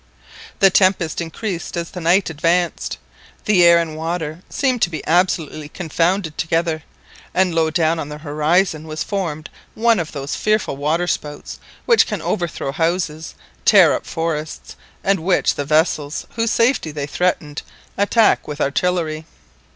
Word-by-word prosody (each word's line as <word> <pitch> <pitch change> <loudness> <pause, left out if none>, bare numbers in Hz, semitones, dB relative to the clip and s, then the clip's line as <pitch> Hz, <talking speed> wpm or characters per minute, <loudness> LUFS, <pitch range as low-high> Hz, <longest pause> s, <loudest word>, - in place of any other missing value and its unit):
The 195 -1 +5
tempest 185 -4 +2
increased 175 +2 -5
as 170 -1 -4
the 180 - -7
night 175 +2 +2
advanced, 170 +3 0 0.5
the 195 -4 +4
air 170 0 +7
and 165 -2 -1
water 160 0 -4
seemed 255 -4 0
to - - +3
be 160 -3 -6
absolutely 160 -3 0
confounded 170 0 -1
together, 165 0 0 0.5
and 185 -1 +2
low 165 -1 +2
down 165 0 +1
on 145 - -5
the 150 - -7
horizon 155 +2 0
was 155 0 -3
formed 165 -7 -3 0.3
one 230 -2 +3
of 165 -2 -4
those 140 -1 -5
fearful 215 -7 0
waterspouts 150 0 -2 0.3
which 470 -2 +4
can - - -3
overthrow 170 -7 -2
houses, 165 0 -2 0.3
tear - - +6
up - - -4
forests, 160 -2 -4 0.3
and 195 -1 +2
which 180 +3 +2
the 145 - -4
vessels 155 0 0
whose 230 0 0
safety 230 - +2
they 145 -2 -4
threaten 150 -1 -1 0.4
attack 210 +2 +3
with 150 0 -6
artillery. 160 +1 -1
165 Hz, 145 wpm, -20 LUFS, 155-180 Hz, 0.5 s, air